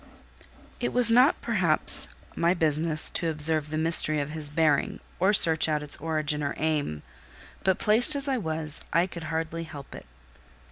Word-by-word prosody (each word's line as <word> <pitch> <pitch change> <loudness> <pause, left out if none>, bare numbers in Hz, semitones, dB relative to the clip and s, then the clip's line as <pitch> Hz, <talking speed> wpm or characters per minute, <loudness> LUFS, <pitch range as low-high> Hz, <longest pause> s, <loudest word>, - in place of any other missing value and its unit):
It 240 - -4
was 240 -2 +4
not 255 +7 +2
perhaps - - +4 0.3
my 170 +2 -1
business 155 -1 +1
to 165 - -3
observe 155 -1 0
the 155 - -5
mystery 160 -1 +3
of 145 +1 -6
his 155 -2 -3
bearing, 150 -1 -1 0.2
or 190 +3 +1
search 160 -6 +4
out 150 -1 -3
its 145 - +1
origin 155 -1 -2
or 140 -1 -5
aim; 145 - -4 0.6
but, 190 -1 0
placed 235 +8 +2
as 280 0 +1
I 270 -2 -2
was, 160 -4 -5
I 170 +1 +1
could 170 -3 -10
hardly 160 +1 -5
help 145 -3 -13
it. - - -13
160 Hz, 170 wpm, -24 LUFS, 150-175 Hz, 0.6 s, was